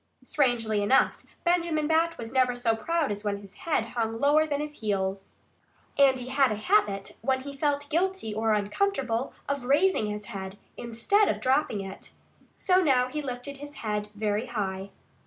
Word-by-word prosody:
Strangely 230 -7 +1
enough, 205 +6 +2 0.2
Benjamin 340 -3 +1
Bat 330 +2 +2
was 230 -1 -6
never 255 -2 +3
so 240 -2 +1
proud 320 +4 0
as 205 0 -4
when 205 -1 -1
his 200 -1 -13
head 265 -9 -1
hung 225 -1 -2
lower 300 +3 +4
than 285 -2 -1
his 295 0 -5
heels. 195 -2 -2 0.6
And 275 -2 +5
he 250 0 -7
had 265 -2 +3
a - - 0
habit, 205 - +1
when 260 +3 +1
he 280 +1 -8
felt 285 0 0
guilty 360 - 0
or 220 +1 +1
uncomfortable, 240 - -1 0.2
of 280 -3 -2
RAISING 290 - +3
his 210 0 -5
head, 195 -3 -7 0.2
instead 240 - +1
of - - 0
dropping 260 -5 +1
it. 195 0 -9 0.4
So 370 -1 +3
now 255 -5 +3
he 300 +3 -3
lifted 265 +1 -6
his 290 +1 -9
head 210 -1 -2
very 210 +2 -1
high. 195 -4 -3
250 Hz, 175 wpm, -27 LUFS, 210-295 Hz, 0.6 s, And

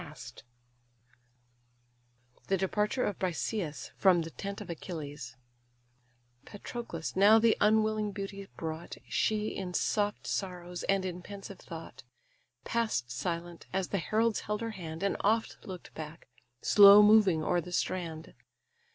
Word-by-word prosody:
THE 195 - +2
DEPARTURE 210 +6 0
OF 205 - -3
BRISEIS 175 -2 -3
FROM 180 -4 +4
THE 165 - -8
TENT 200 +3 -6
OF - - -6
ACHILLES 145 -7 -7 1.1
Patroclus 205 - -6
now 205 +3 +7
the 225 0 +4
unwilling 215 0 +3
beauty 195 0 -6
brought; 160 +1 -5
She, 215 0 0
in 180 -2 -5
soft 205 -1 0
sorrows, 180 -2 -4
and 195 -1 +2
in 180 -1 -4
pensive 195 0 -9
thought, 160 -6 -9 0.6
Pass'd 220 - -1
silent, 170 +5 -4
as 190 -1 -1
the 200 - 0
heralds 220 +7 +1
held 210 +1 -3
her 230 0 -3
hand, 165 -4 -7
And 200 - 0
oft 220 +2 +1
look'd 185 -3 -9
back, 160 +1 -9 0.4
slow 205 0 +9
moving 205 -7 +5
o'er 175 +2 +1
the 180 - -10
strand. 165 -3 -3
190 Hz, 125 wpm, -31 LUFS, 170-210 Hz, 1.1 s, slow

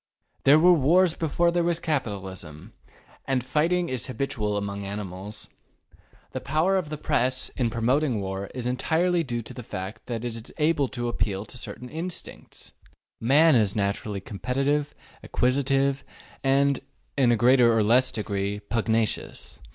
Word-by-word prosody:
There 140 +2 +8
were 180 +3 +6
wars 170 +3 +4
before 170 +1 +1
there 175 0 +1
was 170 -1 +1
capital 120 - -2
ism, 85 -5 -10 0.5
and 130 -3 0
fighting 165 +7 +1
is 130 -5 -2
habitual 115 -6 -2
among 100 0 -4
animals. 100 +1 -6 0.8
The - - -5
power 160 +7 +1
of 180 -6 -1
the 150 - -4
Press 130 -3 0
in 120 -3 -1
promoting 120 +2 +1
war 95 0 -4
is 125 -2 -4
entirely 165 +7 +1
due 120 -5 -3
to - - -10
the 125 - -7
fact 100 0 -7
that 120 -1 -4
it 120 - -3
is 115 +1 -8
able 150 -3 +2
to 120 -2 -4
appeal 105 -4 -2
to - - -12
certain 125 0 -7
instincts. 170 +6 -7 0.5
Man 150 +7 +5
is 105 -4 +2
naturally 100 0 -2
competitive, 135 +8 -1 0.3
acquisitive, 135 +1 +1 0.4
and, 135 0 +3 0.4
in 130 -4 +4
a - - +4
greater 120 0 +5
or 115 -1 +3
less 125 +5 +4
degree, 100 -1 -2
pugnacious. 110 +1 -2
125 Hz, 150 wpm, -26 LUFS, 105-150 Hz, 0.8 s, There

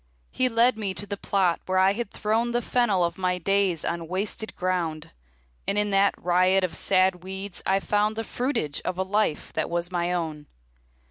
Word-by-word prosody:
He 255 0 +1
led 230 0 +3
me 195 -3 -2
to 205 - -5
the 200 - -4
plot 190 -3 +1
where 185 0 +1
I 190 +1 +5
had 235 -1 -3
thrown 225 +4 0
The 240 - +1
fennel 215 -7 +2
of 170 +1 -2
my 180 -1 +1
days 190 -2 +1
on 170 -1 -3
wasted 200 +4 -3
ground, 175 -4 -2 0.6
And 200 - +1
in 210 0 +1
that 195 0 +3
riot 185 +2 +3
of 180 -3 -2
sad 185 -2 +2
weeds 190 0 -6
I 195 +1 +3
found 210 +2 +1
The 225 - -2
fruitage 240 - -2
of 180 -1 -3
a 190 - +1
life 195 -4 -1
that - - -1
was 175 +1 -2
my 175 0 0
own. 160 -4 -3
190 Hz, 195 wpm, -26 LUFS, 175-210 Hz, 0.6 s, I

